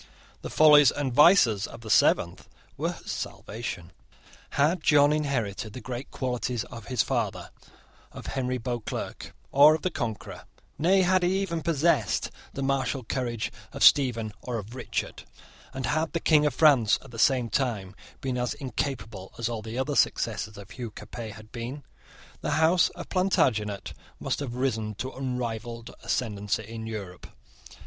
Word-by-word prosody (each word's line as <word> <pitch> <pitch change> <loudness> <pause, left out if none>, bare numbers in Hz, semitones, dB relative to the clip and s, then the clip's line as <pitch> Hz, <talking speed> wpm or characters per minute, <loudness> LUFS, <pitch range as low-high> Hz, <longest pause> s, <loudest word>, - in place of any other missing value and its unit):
The - - -6
follies 150 -3 +7
and 135 -2 -2
vices 125 - +5
of - - -11
the 110 - -9
seventh - - +3 0.3
were - - -2
her - - -12
salvation. 100 -6 -5 0.7
Had 155 +5 +3
John 145 -1 +5
inherited 115 -8 -2
the 130 - -6
great 125 +1 -6
qualities 125 -2 -2
of 115 -5 -10
his 125 -2 +1
father, - - -2 0.6
of - - -10
Henry 130 -1 -2
Beauclerc, 120 -1 -5 0.2
or 145 +3 +7
of 160 - -7
the 185 - 0
Conqueror, 115 -8 -5 0.3
nay, 185 +5 +4
had 185 +1 +3
he 180 +2 +2
even 170 -4 -2
possessed 145 - +1 0.2
the 135 - -4
martial 135 -1 0
courage 120 -1 -3 0.2
of - - -1
Stephen 115 -6 +5
or 125 -2 -3
of 110 +2 -7
Richard, 125 -2 -4 0.5
and 130 -1 -4
had 155 +5 0
the 165 - 0
King 150 -2 +4
of - - -2
France 135 -9 +5
at 135 - -14
the 115 - -8
same 125 0 +3
time 110 -7 -2 0.3
been 130 -2 -2
as 125 0 -1
incapable 115 -7 -4
as 115 0 -1
all 115 -2 -4
the 110 +2 -6
other 140 +2 -1
successors 110 -4 0
of 100 0 -11
Hugh 125 -3 -6
Capet 110 +1 -8
had 110 +1 -14
been, 125 +4 -6 0.6
the - - -1
House 165 +3 +4
of - - -8
Plantagenet 110 - +1 0.3
must - - -2
have 130 -4 -4
risen 110 -5 -1
to 130 +6 -4
unrivalled 120 -3 -4
ascendancy 105 -2 -1
in 110 0 -7
Europe. 100 -5 -7
125 Hz, 160 wpm, -27 LUFS, 110-145 Hz, 0.7 s, follies